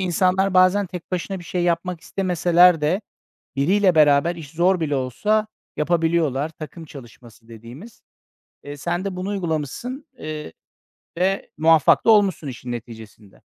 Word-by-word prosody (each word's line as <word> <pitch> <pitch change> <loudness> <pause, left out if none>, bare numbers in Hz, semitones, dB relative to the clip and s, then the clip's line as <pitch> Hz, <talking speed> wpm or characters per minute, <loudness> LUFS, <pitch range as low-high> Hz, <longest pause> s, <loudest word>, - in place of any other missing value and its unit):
insanlar 185 +1 +1
bazen 185 +2 +4
tek 180 0 -9
başına 185 +2 -3
bir 175 - -11
şey 175 +1 -3
yapmak 175 0 -1
istemeseler 180 -2 +3
de 160 +7 0 0.6
biriyle 185 +6 +2
beraber 155 +2 +4
iş 150 -4 -10
zor 175 +3 +1
bile 145 -3 -1
olsa 210 - 0 0.3
yapabiliyorlar. 160 -3 0
Takım 160 +1 -10
çalışması 120 -4 -14
dediğimiz. 120 - -13 0.6
Eee, 145 0 -8
sen 175 +5 -3
de 195 - -4
bunu 185 +2 -4
uygulamışsın, 195 - -4
eee, 155 - -7 0.7
ve 195 +2 -1
muvaffak 160 -2 +4
da - - +7
olmuşsun 195 -8 +3
işin 125 -1 -7
neticesinde. 110 -4 -11
170 Hz, 135 wpm, -22 LUFS, 145-185 Hz, 0.7 s, da